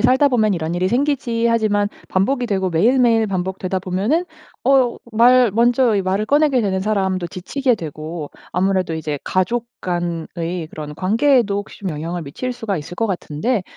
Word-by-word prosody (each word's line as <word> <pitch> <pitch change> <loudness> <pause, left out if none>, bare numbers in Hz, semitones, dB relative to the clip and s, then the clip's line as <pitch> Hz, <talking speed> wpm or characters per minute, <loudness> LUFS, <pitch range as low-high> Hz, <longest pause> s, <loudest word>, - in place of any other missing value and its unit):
살다 265 +3 +4
보면 220 -5 +2
이런 165 -1 -3
일이 180 +1 +1
생기지.' 240 -2 0
하지만 215 -3 +2 0.2
반복이 245 +7 +1
되고 190 -4 0
매일매일 230 +5 +3
반복되다 190 0 -2
보면은 195 - 0 0.4
어 260 -2 +3 0.2
말 245 +1 +5
먼저 235 +1 +3
이 195 - +1
말을 190 +3 0
꺼내게 290 -1 +3
되는 190 -3 0
사람도 190 -3 0
지치게 245 +10 -1
되고 155 -3 -6 0.2
아무래도 185 -2 +1
이제 155 -2 -3
가족 220 +6 0
간의 175 -1 -3
그런 150 -1 -7
관계에도 220 - +2
혹시 205 - -8
좀 195 -3 -3
영향을 165 +3 -4
미칠 160 - -4
수가 225 -5 -3
있을 155 +2 -7
것 225 +4 0
같은데. 195 +4 -2
200 Hz, 355 characters per minute, -20 LUFS, 180-240 Hz, 0.4 s, 말